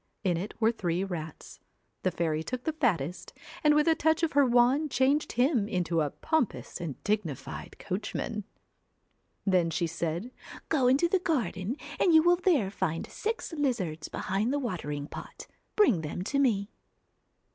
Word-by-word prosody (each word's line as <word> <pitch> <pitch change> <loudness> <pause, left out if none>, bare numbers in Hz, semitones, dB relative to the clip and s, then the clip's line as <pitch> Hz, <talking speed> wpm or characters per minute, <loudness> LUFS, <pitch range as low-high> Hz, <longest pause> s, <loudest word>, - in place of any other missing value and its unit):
In 180 -4 +2
it 190 +6 -4
were 225 0 +4
three 180 -5 -1
rats. 165 -5 -7 0.4
The - - +2
fairy 160 -2 -1
took 250 +9 -4
the 315 - -1
fattest, 180 - -1 0.3
and 300 -1 +5
with 300 +2 +3
a 325 - +6
touch 320 +1 +1
of 325 - +2
her 285 0 +5
wand 250 +5 +4
changed 275 +3 +2
him 245 -4 +2
into 175 -5 0
a 150 - +1
pompous 315 - -2
and 155 -6 -4
dignified 205 - -3
coach 195 +1 -4
man. 215 -2 -3 1.0
Then 180 -4 +3
she 165 +2 0
said, 170 +6 -3 0.2
' - - -14
Go 270 -6 +3
into 275 +7 +4
the 375 +2 +2
garden, 250 - -1 0.2
and 345 -3 +4
you 315 - +7
will 350 +1 +5
there 310 - +2
find 170 -5 -2
six 445 -5 -3
lizards 225 - -1
behind 200 +6 -1
the 290 - +1
watering 150 - -3
pot, - - -9 0.3
bring 255 - +4
them 160 +3 -4
to 275 +8 0
me.' 215 -6 +2
215 Hz, 170 wpm, -29 LUFS, 175-290 Hz, 1.0 s, you